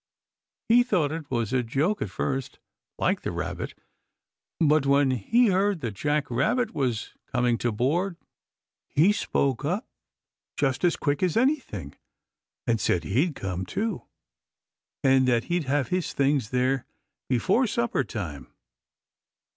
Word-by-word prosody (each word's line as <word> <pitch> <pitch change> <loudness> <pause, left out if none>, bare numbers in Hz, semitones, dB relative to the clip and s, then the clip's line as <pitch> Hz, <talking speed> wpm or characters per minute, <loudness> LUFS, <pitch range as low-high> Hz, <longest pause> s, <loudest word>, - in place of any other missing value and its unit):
He 235 +2 +6
thought 185 - +1
it 160 -2 -5
was 120 -2 -1
a 130 - +3
joke 145 - 0
at - - -2
first, 135 -2 -3 0.4
like - - +1
the - - -3
Rabbit, - - -4 0.8
but 150 -3 +3
when 140 -1 +4
he 220 - +3
heard 195 -1 +1
that 115 -4 -3
Jack 145 +6 -1
Rabbit 220 - +1
was 125 -6 -2 0.2
coming 125 -2 +2
to 120 - 0
board 165 - 0 0.7
he 165 +8 +4
spoke 135 - 0
up 180 - -1 0.7
just 135 +1 0
as 175 -2 +3
quick 145 -1 -1
as 185 -1 +1
anything 230 - 0 0.7
and 115 -3 +1
said 90 - +1
he'd 140 - +1
come, 95 -1 -3
too, 200 - -2 1.0
and 130 -1 +4
that 120 -2 +3
he'd 175 -3 0
have 135 -1 0
his 180 -3 -1
things 140 -4 +1
there 130 +1 0 0.4
before 190 - +2
supper 235 - 0
time. 90 - -6
140 Hz, 140 wpm, -26 LUFS, 125-180 Hz, 1.0 s, He